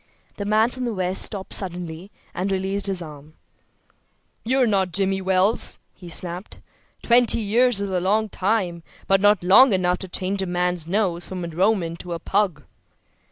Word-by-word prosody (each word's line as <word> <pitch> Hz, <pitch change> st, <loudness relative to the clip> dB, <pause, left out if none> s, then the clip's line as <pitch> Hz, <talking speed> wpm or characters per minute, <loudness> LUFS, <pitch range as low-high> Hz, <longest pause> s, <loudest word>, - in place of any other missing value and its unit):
The 200 Hz, -, -4 dB
man 215 Hz, +3 st, +3 dB
from 255 Hz, 0 st, -5 dB
the 235 Hz, -3 st, -3 dB
West 185 Hz, 0 st, 0 dB
stopped 195 Hz, -2 st, -1 dB
suddenly 180 Hz, -1 st, -4 dB, 0.2 s
and 190 Hz, +2 st, -2 dB
released 195 Hz, +1 st, -2 dB
his 190 Hz, -3 st, -3 dB
arm. 150 Hz, -1 st, -12 dB, 1.1 s
"You're 255 Hz, +2 st, +2 dB
not 195 Hz, -5 st, +1 dB
Jimmy 195 Hz, +1 st, 0 dB
Wells," 190 Hz, +3 st, +2 dB, 0.2 s
he 180 Hz, -2 st, -12 dB
snapped. 175 Hz, +3 st, -1 dB, 0.5 s
"Twenty 240 Hz, -1 st, +4 dB
years 230 Hz, +1 st, +2 dB
is 200 Hz, -1 st, -3 dB
a 185 Hz, -, 0 dB
long 210 Hz, +4 st, +1 dB
time, 185 Hz, -4 st, -1 dB, 0.2 s
but 195 Hz, 0 st, +2 dB
not 205 Hz, -2 st, +3 dB
long 205 Hz, +7 st, +6 dB
enough 180 Hz, -1 st, +1 dB
to 190 Hz, -, -7 dB
change 190 Hz, +2 st, -2 dB
a 190 Hz, -, -2 dB
man's 175 Hz, -2 st, -1 dB
nose 175 Hz, -2 st, -1 dB
from 185 Hz, -2 st, -5 dB
a -, -, -6 dB
Roman 175 Hz, 0 st, 0 dB
to 175 Hz, 0 st, -7 dB
a 170 Hz, -, -4 dB
pug." 190 Hz, -8 st, -1 dB
190 Hz, 170 wpm, -22 LUFS, 180-205 Hz, 1.1 s, long